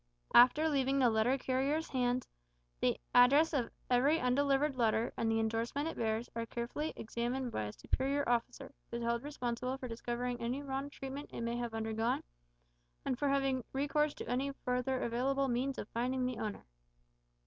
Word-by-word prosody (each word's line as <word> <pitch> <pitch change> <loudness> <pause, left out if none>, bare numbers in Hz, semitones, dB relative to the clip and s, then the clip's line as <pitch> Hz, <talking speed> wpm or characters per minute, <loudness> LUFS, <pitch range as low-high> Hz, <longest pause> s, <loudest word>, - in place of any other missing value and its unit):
After 255 +6 +7
leaving 275 -2 +1
the 250 -4 +4
letter 220 +5 +2
carriers' 270 +5 0
hands, 250 -1 0 0.5
the - - +1
address 285 +7 +6
of 255 -5 0 0.2
every 270 +6 +3
undelivered 275 +3 +2
letter, 230 -1 +1
and 225 -1 0
the 225 - +2
indorsement 230 +6 -1
it - - -6
bears, 225 +1 -1
are 230 0 -3
carefully 240 +7 -3
examined 240 +3 -3
by 110 - -2
a 105 - -4
superior 275 - -1
officer, 240 +3 -1 0.2
who 235 - -3
is 235 - -4
held 235 0 0
responsible 250 -2 -3
for 260 - -6
discovering 240 +1 -3
any 250 +5 -2
wrong 275 0 -3
treatment 275 0 -7
it - - -5
may 235 0 -1
have 240 -2 -3
undergone, 225 +1 -1 0.8
and 255 -2 -1
for 285 - +1
having 270 -2 +1
recourse 290 +2 +1
to - - -7
any 265 +3 0
further 250 +1 0
available 270 +4 +1
means 260 +2 -1
of - - -5
finding 255 +2 -1
the 250 -1 -2
owner. 210 -2 -4
250 Hz, 170 wpm, -34 LUFS, 235-275 Hz, 0.8 s, After